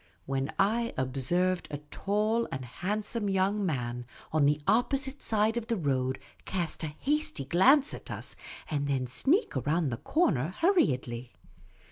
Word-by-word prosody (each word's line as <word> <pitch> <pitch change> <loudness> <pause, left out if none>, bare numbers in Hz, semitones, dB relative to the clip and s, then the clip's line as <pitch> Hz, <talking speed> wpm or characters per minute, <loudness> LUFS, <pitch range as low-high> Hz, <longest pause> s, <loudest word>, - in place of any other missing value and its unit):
"—when 135 +1 -1
I 230 +4 +1
observed 170 +8 0
a 145 - -4
tall 215 +3 0
and 130 -2 -4
hand 200 - -3
some 210 -2 -2
young 195 +2 +1
man 125 -7 -2 0.3
on 150 -3 +4
the 150 +1 +2
opposite 265 - +1
side 220 +1 +2
of 230 -1 -3
the 230 - 0
road 130 -5 0 0.3
cast 175 -4 -3
a - - -1
hasty 295 - -1
glance 265 - +5
at - - -9
us, - - -2 0.3
and 145 -2 -1
then 135 -2 0
sneak 275 - +1
around 160 0 +1
the 120 - -3
corner 170 - +1
hurriedly. 130 - +1
180 Hz, 150 wpm, -29 LUFS, 135-225 Hz, 0.3 s, glance